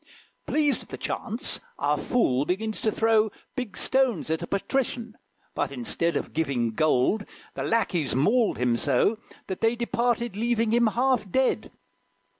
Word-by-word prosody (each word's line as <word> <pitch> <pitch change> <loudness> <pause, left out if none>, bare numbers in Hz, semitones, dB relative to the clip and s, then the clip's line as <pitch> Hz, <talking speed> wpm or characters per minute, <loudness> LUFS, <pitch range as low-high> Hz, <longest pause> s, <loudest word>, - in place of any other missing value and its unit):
Pleased 295 -2 +1
at - - -14
the - - -6
chance, 230 +7 -3 0.2
our - - +1
fool 140 - +1
begins 210 +7 -2
to 220 - +2
throw 220 0 +3 0.3
Big 250 -7 -4
stones 255 -12 +1
at 160 - 0
a - - -4
patrician; 235 +1 -2 0.4
but, - - -1
instead 140 +6 -1
Of - - -3
giving 135 -7 0
gold, 155 - +2 0.3
the - - -4
lackeys 180 - 0
mauled 215 - +3
him 125 -1 +1
so, 215 - +2 0.3
That 190 - -5
they 225 +1 +3
departed 235 -1 0
leaving 230 0 +1
him 235 0 +4
half 245 -2 +1
dead. 260 +7 +1
220 Hz, 150 wpm, -26 LUFS, 160-240 Hz, 0.4 s, him